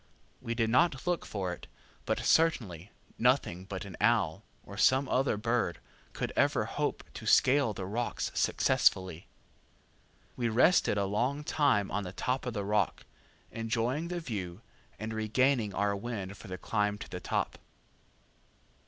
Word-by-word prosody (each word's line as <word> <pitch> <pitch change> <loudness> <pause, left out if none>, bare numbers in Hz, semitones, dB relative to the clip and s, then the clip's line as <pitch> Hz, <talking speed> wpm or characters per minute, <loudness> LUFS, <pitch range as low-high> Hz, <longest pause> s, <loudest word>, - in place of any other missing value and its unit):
We 115 - -3
did 115 -1 +1
not 135 +3 +3
look 175 -2 -1
for 95 -4 -3
it, - - -11 0.4
but - - 0
certainly 110 - +2 0.3
nothing 125 -8 +2
but 95 0 -6
an 95 -3 -8
owl, 105 -4 +2 0.2
or 100 - -10
some 130 +6 +4
other 130 -4 +1
bird, 115 -4 0 0.4
could - - -3
ever - - +2
hope - - -2
to - - -8
scale 135 -2 +4
the 95 -2 -5
rocks 115 +5 -2
successfully. 95 -2 +2 1.1
We 120 -2 0
rested 120 - +4
a 100 - +1
long 125 +9 -1
time 140 -10 +2
on 105 - -1
the 90 -1 -7
top 130 +4 -2
of 125 - -2
the 100 -1 -2
rock, 105 -2 0 0.5
enjoying 115 +7 -1
the 175 0 -3
view, 100 - -5 0.4
and 110 +2 -5
regaining 110 +1 +1
our 100 0 +1
wind 100 -3 -5
for 110 - -12
the 95 0 -5
climb 105 -1 0
to - - -8
the - - -6
top. - - -2
110 Hz, 155 wpm, -30 LUFS, 100-130 Hz, 1.1 s, some